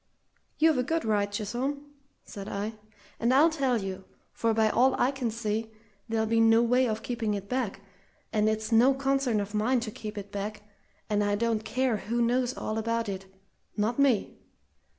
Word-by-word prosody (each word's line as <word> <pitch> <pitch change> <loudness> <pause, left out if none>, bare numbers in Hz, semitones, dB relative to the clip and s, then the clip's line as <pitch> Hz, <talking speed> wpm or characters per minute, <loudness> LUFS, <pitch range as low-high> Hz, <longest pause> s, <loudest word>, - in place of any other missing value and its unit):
"You've 315 -3 +4
a - - +2
good 325 +3 -1
right, 205 -2 +1
Chisholm," 260 +8 -3 0.3
said 200 -1 -8
I; 205 +3 -3 0.5
"and 235 +2 +2
I'll 295 +6 +5
tell 270 -6 +1
you, 190 -1 -5 0.3
for 230 - +1
by 220 0 +3
all 255 +4 +3
I 255 - +3
can 265 -4 -2
see, 220 0 -3 0.4
there'll 220 -1 +1
be 225 +1 +2
no 225 +1 +5
way 250 +2 +3
of 220 0 -3
keeping 230 -4 -1
it 200 0 -6
back, 240 -6 -2 0.5
and 215 -1 +3
it's 220 0 -2
no 245 +4 +5
concern 270 -4 +1
of 205 +1 -4
mine 230 +5 +2
to 225 -2 -4
keep 215 0 -7
it 200 0 -7
back, 205 +1 -5 0.4
and 210 -1 +1
I 205 0 +1
don't 225 0 0
care 255 0 0
who 235 +3 -3
knows 245 +2 +1
all 215 +1 -2
about 230 0 -1
it 190 -1 -5 0.5
not 220 +5 0
me! 270 -7 +2
225 Hz, 185 wpm, -28 LUFS, 210-255 Hz, 0.5 s, I'll